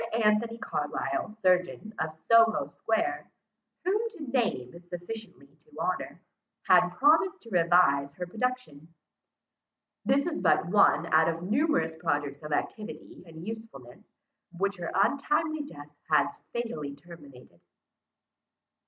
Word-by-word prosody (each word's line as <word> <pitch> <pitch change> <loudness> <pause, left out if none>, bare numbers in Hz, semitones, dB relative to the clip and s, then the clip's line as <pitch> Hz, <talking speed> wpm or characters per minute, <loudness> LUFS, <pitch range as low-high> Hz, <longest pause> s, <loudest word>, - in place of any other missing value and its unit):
Anthony 220 +2 +2
Carlisle, 220 -1 -3
surgeon, 180 +3 +1
of 160 0 -1
Soho 225 +7 +3
square, 345 +11 -2 0.5
whom 390 +3 +2
to 315 -8 -8
name 215 - 0
is 175 0 -15
sufficiently 180 -1 -8
to 150 0 -20
honour, 180 +2 -2 0.4
had - - +5
promised 325 +6 +3
to 230 - -13
revise 165 -6 +4
her 180 +4 -5
production. 215 - -4 1.1
This 280 +1 +2
is 335 -2 -2
but - - +3
one 180 -2 +4
out 160 +1 +5
of 165 +1 -4
numerous 200 - +1
projects 145 -3 -2
of 150 0 -8
activity 215 +8 -4
and 160 +1 -10
usefulness, 215 - -9 0.5
which 200 +1 -1
her 170 -2 -4
untimely 295 - +1
death 145 - -12
has 155 +2 +3 0.2
fatally 155 -13 -4
terminated. 140 - -15
180 Hz, 120 wpm, -28 LUFS, 160-230 Hz, 1.1 s, had